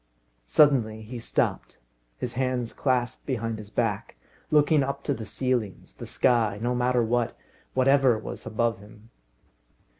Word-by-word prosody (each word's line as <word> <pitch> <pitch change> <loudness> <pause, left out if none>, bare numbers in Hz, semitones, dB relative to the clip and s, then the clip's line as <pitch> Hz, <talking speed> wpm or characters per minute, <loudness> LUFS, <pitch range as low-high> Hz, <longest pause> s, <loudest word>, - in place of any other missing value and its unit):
Suddenly 115 - +3
he 120 +3 -7
stopped, 115 - -1 0.4
his 120 - -4
hands 125 -1 -1
clasped 125 -3 -1
behind 115 -4 -2
his 105 -1 -9
back, 110 -3 -2 0.3
looking 150 0 +4
up 140 +1 -3
to 140 - 0
the 110 -5 -7
ceilings 120 -4 -2
the - - -9
sky 115 -5 +2
no 120 +3 0
matter 125 0 +2
what 120 +1 0 0.4
whatever 130 -2 +4
was 110 - -7
above 115 -1 0
him. 105 +2 -16
120 Hz, 140 wpm, -26 LUFS, 110-130 Hz, 0.4 s, looking